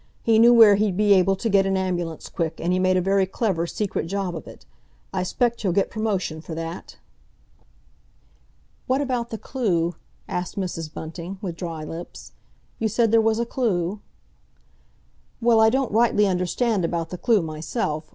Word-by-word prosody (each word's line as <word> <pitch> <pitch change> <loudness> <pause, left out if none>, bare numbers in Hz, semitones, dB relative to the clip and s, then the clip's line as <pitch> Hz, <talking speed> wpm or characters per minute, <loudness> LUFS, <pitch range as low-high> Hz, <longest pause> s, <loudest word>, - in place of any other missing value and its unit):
He 225 -1 +4
knew 235 +1 +7
where 220 -4 +8
he'd 205 -3 0
be 210 -1 +5
able 195 0 +3
to 210 - -3
get 195 -2 +3
an 195 0 +1
ambulance 175 -4 -3
quick, 165 -2 -3
and 175 +2 0
he 185 - +1
made 185 0 +3
a - - +2
very 195 +1 +2
clever, 190 -4 -1
secret 200 -3 -3
job 190 -1 -3
of 160 - -8
it. - - -13 0.5
I 190 - -1
'spect 235 +6 0
he'll 190 -5 0
get 195 - +1
promotion 195 -8 -2
for 160 0 -7
that!" 165 +1 -6 1.9
"What 260 +2 +2
about 250 -4 -2
the 225 - -5
clue?" 180 -10 -1 0.3
asked 180 -1 -4
Mrs. 165 -5 -4
Bunting, 170 +4 -7
with 180 -4 -5
dry 165 -3 -5
lips. 165 +3 -9 0.5
"You 225 - +1
said 225 +1 +1
there 225 0 +5
was 220 0 +2
a 235 - 0
clue?" 205 -6 -1 1.4
"Well, 230 -1 +4
I 220 - +6
don't 265 +1 0
rightly 220 -1 +3
understand 190 +3 0
about 165 -1 -2
the 180 - -5
clue 220 -6 +3
myself. 155 0 -3
195 Hz, 175 wpm, -23 LUFS, 170-225 Hz, 1.9 s, where